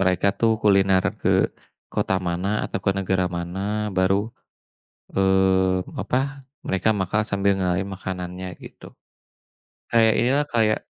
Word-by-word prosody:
mereka 95 0 +2
tuh 115 - +3
kuliner 95 -2 +4 0.2
ke - - 0 0.6
kota 95 - 0
mana 90 +3 -2 0.2
atau - - -3
ke 100 - +3
negara 95 -1 0
mana, 85 +2 -5 0.4
baru, 95 +1 +3 1.0
eee, 95 -1 +2
apa, - - -1 0.5
mereka 95 +2 0
makan 100 +3 0
sambil 100 0 +2
ngenalin 95 +1 -1
makanannya, 90 -1 -6 0.2
gitu. - - -13 1.1
Kayak 115 -1 +5
inilah, 135 +5 +2
kayak 110 -2 +3
95 Hz, 120 wpm, -23 LUFS, 95-100 Hz, 1.1 s, Kayak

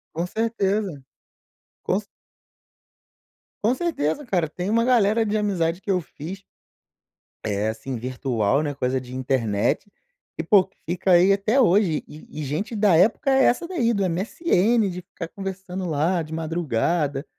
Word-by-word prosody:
Com 170 +2 -1
certeza. 205 -6 -1 0.8
Com 185 - +1
ce 210 - -12 1.6
Com 225 +4 +3
certeza 295 - -1
cara, 180 -8 0
tem 180 +5 -4
uma 230 +2 +3
galera 225 -2 +3
de 215 0 -1
amizade 185 -5 0
que 200 - -10
eu 185 - +3
fiz 170 +5 -9 1.0
eh, 105 0 0
assim 110 +4 -5
virtual, 125 0 0
né? 145 -1 -2
Coisa 130 -1 -1
de 125 0 -11
internet, 125 - 0 0.5
que - - -2
pô 200 -4 +4 0.2
fica 185 +3 0
aí 180 +2 +6
até 210 +6 +1
hoje. 185 -7 +3
E 150 - -12
e 155 - -5
e - - -3
gente 160 - -3
da 205 -4 +4
época 215 - +3
é 265 0 +5
essa, 255 +8 +2
daí 245 -11 +1
do 200 -2 0
MSN 210 - +1
de 180 0 -6
ficar 180 -2 -8
conversando 190 -1 -6
lá 165 +4 +1
de 155 0 -9
madrugada, 155 -2 -1
180 Hz, 155 wpm, -23 LUFS, 150-210 Hz, 1.6 s, aí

